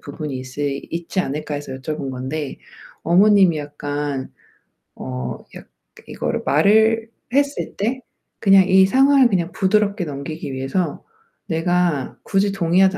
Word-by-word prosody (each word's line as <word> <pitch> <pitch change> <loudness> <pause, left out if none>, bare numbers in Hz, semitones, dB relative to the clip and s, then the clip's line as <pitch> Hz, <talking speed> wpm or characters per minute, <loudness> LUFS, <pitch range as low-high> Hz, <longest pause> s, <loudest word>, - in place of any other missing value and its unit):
부분이 150 -4 -6
있시 140 +2 -4
있지 170 +3 -2
않을까.' 150 -2 -4
해서 145 -2 -6
여쭤본 135 +1 -5
건데 130 +3 -5 0.4
어머님이 190 -1 +5
약간 145 -2 -4 0.7
어 65 0 -5 0.2
약 - - -11 0.4
이거를 - - -3
말을 220 +8 +3 0.2
했을 280 +1 0
때 240 +6 -2 0.4
그냥 195 -2 +6
이 190 0 +6
상황을 270 +3 +5
그냥 180 -4 0
부드럽게 200 0 +1
넘기기 145 0 -6
위해서 140 +5 -2 0.4
내가 165 -3 0
굳이 195 +1 +1
동의하지 190 +1 +3
170 Hz, 275 characters per minute, -20 LUFS, 145-195 Hz, 0.7 s, 그냥